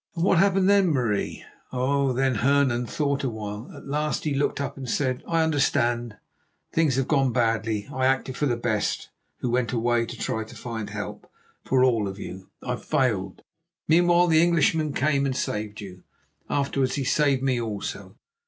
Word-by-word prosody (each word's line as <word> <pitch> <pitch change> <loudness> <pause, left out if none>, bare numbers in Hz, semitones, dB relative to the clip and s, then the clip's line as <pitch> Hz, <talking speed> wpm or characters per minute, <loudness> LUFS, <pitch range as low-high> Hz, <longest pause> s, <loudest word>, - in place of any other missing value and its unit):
'" - - -40
"And 165 - -1
what 185 -2 +4
happened 195 0 +3
then, 200 -1 +5
Marie?" 120 -9 -1 0.3
"Oh, 135 +2 +1
then 130 +1 +1
Hernan 130 -2 +2
thought 140 0 -1
a 135 - 0
while. 105 0 -6
At - - -12
last 150 +2 -1
he 150 - -1
looked 140 +1 0
up 140 -1 -3
and 130 -3 -7
said: 130 0 0
'I 165 -1 +2
understand. 120 -7 +1 0.6
Things 160 -6 +2
have 135 -1 0
gone 135 -4 +2
badly. 115 -3 0
I 130 0 +1
acted 130 -1 0
for 145 - 0
the 120 -2 0
best, 110 -3 -1 0.3
who 125 - -1
went 125 0 0
away 120 0 +1
to 120 - -7
try 110 0 -2
to 110 +2 -13
find 110 -2 -5
help 105 0 -7 0.3
for 130 -1 +2
all 115 -5 +2
of 95 0 -6
you. 95 -1 -8
I 125 -1 -2
failed. 115 -12 -1 0.4
Meanwhile 175 +2 +5
the 160 -2 +4
Englishman 160 -2 +2
came 140 -1 +1
and 130 - -2
saved 105 -4 -3
you. 90 -2 -10 0.5
Afterwards 135 -2 0
he 140 - -1
saved 140 -1 +2
me 130 -3 +1
also. 105 -3 -5
130 Hz, 180 wpm, -25 LUFS, 115-145 Hz, 0.6 s, then